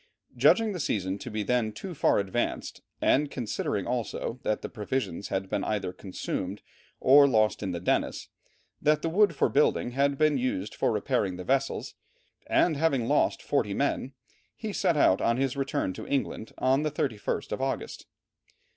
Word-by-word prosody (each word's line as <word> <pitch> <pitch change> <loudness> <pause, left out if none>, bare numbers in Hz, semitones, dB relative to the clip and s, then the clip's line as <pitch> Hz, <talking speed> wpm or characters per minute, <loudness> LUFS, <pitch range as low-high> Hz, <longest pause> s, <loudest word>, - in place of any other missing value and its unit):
Judging 225 -1 +4
the 180 - -5
season 100 - -1
to 125 - -7
be 105 -1 -2
then 120 0 +1
too 185 - -7
far 150 - +2
advanced, 100 +4 -2 0.2
and 145 +1 +3
considering 110 -6 -2
also 120 0 -3
that 110 - -1
the - - -2
provisions 105 -4 -3
had 95 0 -2
been - - -2
either 105 -4 -2
consumed, 95 0 -5 0.4
or 140 +2 +7
lost 110 -4 +2
in 100 - -2
the 85 -1 -3
Dennis, 90 - -1 0.5
that 150 0 +2
the 165 - 0
wood 190 0 +3
for - - +3
building 140 -3 +2
had 140 +2 +1
been 155 -2 +3
used 105 -5 -2
for - - +1
repairing 95 -2 0
the 90 - -7
vessels, 135 +5 -1 0.5
and 160 -4 +3
having 140 -6 +1
lost - - +2
40 - - 0
men, 135 - -1 0.4
he 215 -2 -5
set 170 - +1
out 95 -9 +4
on 115 +1 +2
his 135 0 0
return 135 -7 -1
to - - -8
England 135 -5 -2
on 130 +2 +2
the 155 - 0
31st 125 -8 -2
of - - -3
August. 135 0 -3
125 Hz, 175 wpm, -28 LUFS, 105-140 Hz, 0.5 s, or